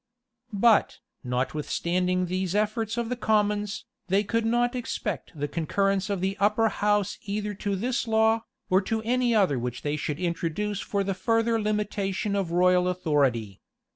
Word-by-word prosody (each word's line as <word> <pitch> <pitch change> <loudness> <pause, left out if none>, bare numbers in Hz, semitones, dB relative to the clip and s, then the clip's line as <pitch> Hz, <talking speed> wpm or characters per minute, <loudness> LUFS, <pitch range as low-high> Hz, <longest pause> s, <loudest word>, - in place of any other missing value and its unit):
But, 215 +1 +3 0.3
notwithstanding 170 +8 -1
these 185 +1 -2
efforts 215 +2 0
of 235 -1 -1
the 250 - -1
commons, 210 -2 0 0.2
they 195 +2 +2
could 230 +2 0
not 240 +2 +2
expect 225 -5 -4
the 145 - -1
concurrence 195 +6 0
of 200 -3 -1
the 190 +1 0
upper 210 +3 +3
house 205 -1 0
either 210 +1 -2
to 200 -1 0
this 240 +5 -1
law, 220 0 +3 0.3
or 185 +1 +3
to 220 +2 -2
any 245 0 +1
other 185 - +3
which 125 0 -4
they 145 0 -1
should 150 0 -3
introduce 180 +3 -2
for 200 0 -1
the 195 0 -1
further 225 +3 +1
limitation 205 -1 -1
of 195 -4 -1
royal 180 +1 +4
authority. 140 - 0
200 Hz, 155 wpm, -26 LUFS, 180-220 Hz, 0.3 s, royal